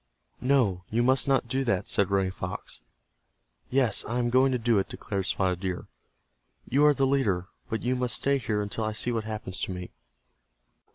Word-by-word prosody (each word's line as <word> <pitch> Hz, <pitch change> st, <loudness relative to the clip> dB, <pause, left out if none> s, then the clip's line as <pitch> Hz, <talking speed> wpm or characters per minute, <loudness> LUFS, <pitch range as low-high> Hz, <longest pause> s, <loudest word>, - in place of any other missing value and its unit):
"No, 120 Hz, -9 st, +2 dB
you 115 Hz, +2 st, +1 dB
must 130 Hz, +1 st, +3 dB
not 135 Hz, -3 st, +2 dB
do 135 Hz, +2 st, 0 dB
that," 115 Hz, -8 st, 0 dB
said 100 Hz, -, +3 dB
Running 95 Hz, -1 st, +1 dB
Fox. 90 Hz, -, -6 dB, 0.9 s
"Yes, 125 Hz, -5 st, +2 dB
I 120 Hz, -, -2 dB
am 120 Hz, -1 st, 0 dB
going 130 Hz, +2 st, +4 dB
to 125 Hz, -, +1 dB
do 115 Hz, -3 st, +2 dB
it," 95 Hz, -, -2 dB
declared 95 Hz, -2 st, -3 dB
Spotted 90 Hz, -2 st, +1 dB
Deer. 90 Hz, -1 st, -3 dB, 0.8 s
"You 145 Hz, +4 st, +4 dB
are 150 Hz, -, +6 dB
the 135 Hz, -, +2 dB
leader, 105 Hz, -10 st, +1 dB, 0.2 s
but 110 Hz, -2 st, -2 dB
you 125 Hz, +1 st, +1 dB
must 125 Hz, -3 st, -1 dB
stay 140 Hz, 0 st, +1 dB
here 105 Hz, -3 st, -1 dB
until 105 Hz, +2 st, -4 dB
I 110 Hz, 0 st, -1 dB
see 120 Hz, +3 st, -1 dB
what 115 Hz, -2 st, -2 dB
happens 105 Hz, -4 st, -5 dB
to -, -, -2 dB
me. 90 Hz, -1 st, -6 dB
115 Hz, 190 wpm, -27 LUFS, 95-130 Hz, 0.9 s, are